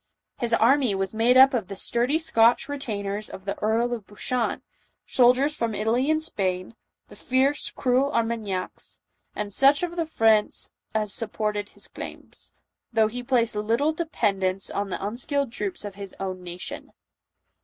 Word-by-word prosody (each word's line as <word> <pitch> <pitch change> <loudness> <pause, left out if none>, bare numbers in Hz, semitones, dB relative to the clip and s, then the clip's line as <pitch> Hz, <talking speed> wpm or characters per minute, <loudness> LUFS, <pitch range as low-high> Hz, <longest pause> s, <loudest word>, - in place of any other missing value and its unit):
His 240 -3 -1
army 235 -1 +4
was 195 +1 -1
made 235 +3 +4
up 265 +1 +8
of 225 -7 -1
the 195 - -6
sturdy 240 +9 +2
Scotch 235 -7 +3
retainers 215 -8 -4
of 190 - -10
the 200 - -2
Earl 230 +3 +1
of 225 -5 -6
Buchan, 235 +3 -2 0.4
soldiers 260 +4 +4
from 230 -6 -2
Italy 230 +7 +1
and 315 0 +2
Spain, 185 - -2 0.3
the - - -14
fierce, 270 +1 +1
cruel 260 +2 +1
Armagnacs, 225 -7 -2 0.4
and 205 -1 -2
such 275 - +5
of 345 -1 -2
the 330 -2 0
French 220 -7 +2 0.3
as 210 -2 0
supported 210 -2 -2
his - - -11
claims, - - -8 0.4
though 220 -2 +3
he 245 +3 -5
placed 240 -3 +1
little 230 +9 +1
dependence 195 - 0
on 200 0 -2
the 190 - -4
unskilled 260 +4 -2
troops 365 - -4
of 205 - -6
his 200 -1 -8
own 185 -1 -4
nation. 175 0 -7
230 Hz, 155 wpm, -25 LUFS, 205-260 Hz, 0.4 s, up